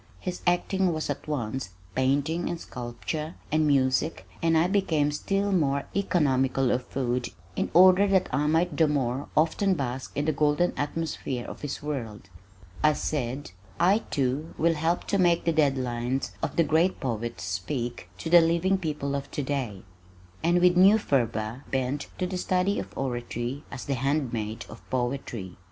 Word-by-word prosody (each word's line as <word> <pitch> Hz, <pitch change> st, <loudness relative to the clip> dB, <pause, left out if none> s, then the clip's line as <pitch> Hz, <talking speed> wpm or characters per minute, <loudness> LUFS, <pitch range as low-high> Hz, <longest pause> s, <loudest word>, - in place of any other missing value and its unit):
His 180 Hz, -1 st, -5 dB
acting 185 Hz, +1 st, +2 dB
was 155 Hz, -2 st, -2 dB
at 145 Hz, -, -6 dB
once 130 Hz, -6 st, -3 dB, 0.2 s
painting 145 Hz, +6 st, +1 dB
and 170 Hz, -, -3 dB
sculpture 140 Hz, +6 st, -5 dB, 0.2 s
and 155 Hz, 0 st, +3 dB
music 135 Hz, +2 st, +1 dB
and 165 Hz, -1 st, +3 dB
I 160 Hz, -, +4 dB
became 170 Hz, -6 st, +1 dB
still 195 Hz, +7 st, -1 dB
more 140 Hz, -6 st, +2 dB
economical 135 Hz, -9 st, +2 dB
of 125 Hz, 0 st, -1 dB
food 125 Hz, -2 st, -1 dB, 0.3 s
in -, -, -1 dB
order 185 Hz, +3 st, +7 dB
that 190 Hz, -2 st, +3 dB
I 145 Hz, +3 st, +2 dB
might 165 Hz, +3 st, +2 dB
the 160 Hz, -, +4 dB
more 135 Hz, -2 st, -1 dB
often 185 Hz, +5 st, +3 dB
bask 130 Hz, -3 st, -4 dB
in 145 Hz, -, 0 dB
the 155 Hz, -, +2 dB
golden 150 Hz, +4 st, +2 dB
atmosphere 145 Hz, -4 st, -3 dB
of -, -, -8 dB
his 145 Hz, 0 st, -5 dB
world. 115 Hz, -9 st, -5 dB, 0.5 s
I 155 Hz, 0 st, +5 dB
said, 135 Hz, -5 st, -3 dB, 0.3 s
"I, 195 Hz, +5 st, +5 dB
too, 140 Hz, +3 st, -1 dB
will 165 Hz, +1 st, +3 dB
help 165 Hz, +2 st, 0 dB
to 200 Hz, -, 0 dB
make 175 Hz, -2 st, +3 dB
the 165 Hz, -, +2 dB
dead 145 Hz, -4 st, +3 dB
lines 125 Hz, +1 st, -2 dB
of -, -, -2 dB
the 165 Hz, -, +4 dB
great 165 Hz, +4 st, +2 dB
poets 120 Hz, -3 st, -3 dB
speak 100 Hz, +3 st, -4 dB
to 125 Hz, -, -5 dB
the 175 Hz, -1 st, +9 dB
living 170 Hz, +4 st, +2 dB
people 150 Hz, -5 st, -2 dB
of 140 Hz, 0 st, -3 dB
today," 130 Hz, -9 st, -3 dB, 0.6 s
and 175 Hz, +2 st, +3 dB
with 180 Hz, 0 st, +5 dB
new 195 Hz, +4 st, +7 dB
fervor 115 Hz, -, -1 dB
bent 135 Hz, +2 st, -1 dB
to 185 Hz, -, -1 dB
the 180 Hz, 0 st, -3 dB
study 185 Hz, +3 st, +1 dB
of -, -, -8 dB
oratory 120 Hz, +1 st, -3 dB
as 130 Hz, -, -7 dB
the 140 Hz, -, -1 dB
handmaid 125 Hz, -5 st, -1 dB
of 110 Hz, -, -11 dB
poetry. 120 Hz, -7 st, -3 dB
145 Hz, 165 wpm, -27 LUFS, 125-170 Hz, 0.6 s, the